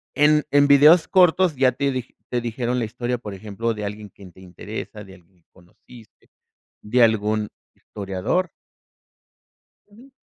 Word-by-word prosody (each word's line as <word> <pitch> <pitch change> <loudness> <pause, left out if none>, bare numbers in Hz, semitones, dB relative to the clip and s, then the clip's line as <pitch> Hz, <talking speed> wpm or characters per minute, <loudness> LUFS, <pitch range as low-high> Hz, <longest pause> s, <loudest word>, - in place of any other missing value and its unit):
en 150 +2 +3
en 145 0 +4
videos 150 +4 +6
cortos 180 -2 +3
ya 130 -1 +3
te 140 +2 -2
dij 130 -1 -6 0.2
te 120 - -2
dijeron 120 +1 -3
la 115 - -1
historia, 120 +2 -4
por 105 -4 -9
ejemplo, 110 +3 -4
de 105 -1 -6
alguien 105 0 -7
que 100 - -16
te 95 +1 -18
interesa, 105 +3 -9
de 95 -1 -14
alguien 90 0 -25
que - - -68
conociste, 100 +5 -20 0.5
de 120 +4 +1
algún 110 -1 0 0.3
historiador. 100 - -3 1.4
Ujú. 240 +7 -18
115 Hz, 150 wpm, -22 LUFS, 105-140 Hz, 1.4 s, videos